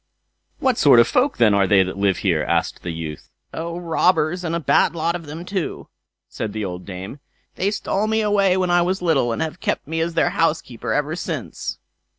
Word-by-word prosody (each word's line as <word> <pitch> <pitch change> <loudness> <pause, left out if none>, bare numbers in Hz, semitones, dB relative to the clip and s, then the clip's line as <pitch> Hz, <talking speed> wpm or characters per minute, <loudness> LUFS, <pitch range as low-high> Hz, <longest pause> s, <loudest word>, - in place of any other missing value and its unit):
"What 260 -3 +1
sort 140 -5 +7
of 120 - +6
folk, 265 +3 +1
then, 110 -3 +4
are 100 -1 +3
they 95 -1 +5
who 95 - -4
live 100 -1 +1
here?" 85 -5 +2
asked - - -1
the 90 - -5
youth. 80 -2 -7 0.2
"Oh, 170 +1 -4
robbers! 170 0 +1
And 165 -1 -2
a - - 0
bad 165 +2 +2
lot 165 +1 0
of 170 -3 -7
them 160 +4 -7
too", 190 -4 -4 0.4
said 110 -2 -5
the 110 -1 -3
old 90 -1 -6
dame. 95 +8 -7 0.3
"They 195 - 0
stole 205 0 -1
me 220 0 +1
away 200 -3 +2
when 185 -1 +1
I 175 0 +4
was 185 +1 -1
little, 140 -8 +2
and 115 - -1
have 160 - -5
kept - - -2
me 160 +2 -2
as 165 0 -2
their - - +2
housekeeper 155 -7 -1
ever 150 +2 0
since." - - -5
160 Hz, 210 wpm, -21 LUFS, 110-180 Hz, 0.4 s, sort